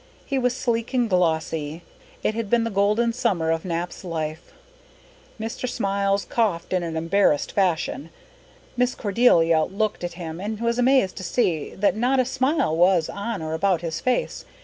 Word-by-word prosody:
He 275 -1 -1
was 250 -1 +1
sleek 235 +1 -1
and 245 -2 +2
glossy. 160 -3 0 0.4
It - - +1
had 225 -2 -3
been 235 0 +3
the 230 - -2
golden 210 +4 +2
summer 190 -10 0
of 165 0 -1
Nap's 175 0 -4
life. 160 -2 -5 0.9
Mr. 225 +3 -4
Smiles 200 -3 0
coughed 205 -7 -1
in 185 - +2
an 165 -1 -4
embarrassed 165 -2 +2
fashion. 175 -4 0 0.7
Miss 250 0 +1
Cordelia 175 -7 +3
looked 210 0 -2
at 175 -1 -3
him 170 -1 -7
and 210 +1 -4
was 235 +1 0
amazed 250 -6 +3
to 185 - -6
see 170 - -1
that 205 +2 +2
not 250 +4 +2
a 255 - +3
smile 260 - +1
was 175 -1 +3
on 200 -3 -4
or 155 0 -3
about 180 0 +1
his 165 -2 -3
face. 255 -1 -1
195 Hz, 170 wpm, -24 LUFS, 165-235 Hz, 0.9 s, been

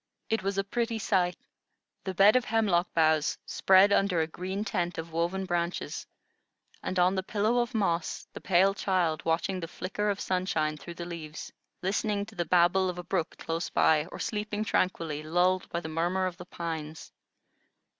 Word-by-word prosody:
It 225 - +2
was 195 +1 -2
a 195 - +2
pretty 230 +3 -1
sight, 185 -4 +1 0.7
the 190 -1 -3
bed 200 +5 +6
of 250 -1 +3
hemlock 200 -6 +1
boughs 155 -2 +3
spread 195 +1 +5
under 195 -4 +2
a 160 - +2
green 190 +5 -4
tent 175 -3 -2
of 165 0 -5
woven 170 +4 -1
branches, 175 -1 -2 0.7
and 185 - -3
on 180 +1 +4
the 190 - 0
pillow 215 +5 +1
of 240 0 -1
moss 170 -6 -1
the - - -8
pale 190 +1 +4
child 180 -5 0
watching 170 +3 0
the 165 - -5
flicker 195 +4 -3
of 200 0 -1
sunshine 180 -5 0
through 170 +3 -9
the 170 - -6
leaves, 160 -3 -7 0.3
listening 200 +2 0
to - - -14
the 175 - -2
babble 180 +3 +3
of 180 - -5
a 180 - -5
brook 175 -2 -2
close 165 +1 -3
by, 155 0 +3
or - - -9
sleeping 210 0 -2
tranquilly, 165 -7 0
lulled 180 +4 +1
by 170 - -2
the 165 - -7
murmur 175 +4 0
of 180 -1 -3
the 180 - -9
pines. 160 -3 -6
180 Hz, 180 wpm, -29 LUFS, 170-195 Hz, 0.7 s, bed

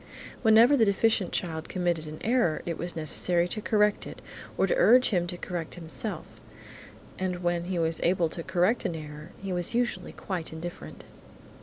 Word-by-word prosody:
Whenever 230 +4 +6
the 240 - +4
deficient 205 -1 +2
child 160 -2 -3
committed 175 -4 -1
an 155 0 -7
error, 230 -9 +1
it 170 - -2
was 175 +2 -4
necessary 170 +2 0
to 215 - -4
correct 210 -1 +1
it, - - -9 0.4
or - - +3
to - - +1
urge 255 - +5
him 175 -4 0
to 175 - -4
correct 175 -1 -5
it - - -7
himself, 170 +6 -6 0.8
and 180 -1 -2
when 175 0 0
he 180 0 -3
was 165 -1 -1
able 175 -1 +2
to 165 - -6
correct 185 +7 +1
an 170 - -2
error 150 0 -8
he 195 -1 -3
was 175 +5 0
usually 240 0 -1
quite 180 -5 -5
indifferent. 170 +2 -8
175 Hz, 180 wpm, -28 LUFS, 165-210 Hz, 0.8 s, Whenever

